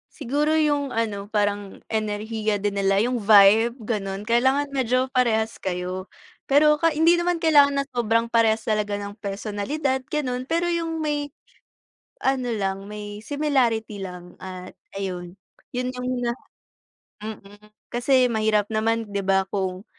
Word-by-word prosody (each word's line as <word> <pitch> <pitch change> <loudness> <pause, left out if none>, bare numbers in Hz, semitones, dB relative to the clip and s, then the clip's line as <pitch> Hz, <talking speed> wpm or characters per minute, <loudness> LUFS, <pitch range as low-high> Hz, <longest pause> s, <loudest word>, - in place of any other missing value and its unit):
Siguro 295 +5 0
yung 290 -3 +1
ano 215 -3 -2
parang 205 -1 -2
enerhiya 215 -1 -2
din 205 0 -1
nila 195 0 +2
yung 245 +3 +1
vibe 215 +2 +6
gano'n 205 -1 -4
kailangan 265 +5 +3
medyo 260 -1 0
parehas 230 -4 +1
kayo. 185 0 -4 0.4
Pero 300 +2 +5
ka 330 +1 +2
hindi 330 +3 +4
naman 345 -1 0
kailangan 290 -3 +5
na - - -1
sobrang 230 0 +1
parehas 225 -1 +3
talaga 210 -2 -1
ng 205 +1 -7
personalidad 230 +7 -2
gano'n, 255 -4 -1
pero 335 +4 0
yung 330 -1 -2
may, 290 -2 -2 0.9
ano 265 -2 +1
lang 195 -3 -2
may 210 0 -7
similarity 240 -7 0
lang 180 -2 -9
at 185 -1 -8 0.2
ayun, 180 -2 -5 0.4
'yon 250 0 -1
yung 250 0 -5 0.2
na 235 - +1 0.9
mm 205 -1 -9 0.3
kasi 250 0 +3
mahirap 215 -1 +1
naman 225 +1 +1
'di 200 - -1
ba, 195 0 +2
kung, 190 -1 -2
225 Hz, 140 wpm, -24 LUFS, 205-265 Hz, 0.9 s, vibe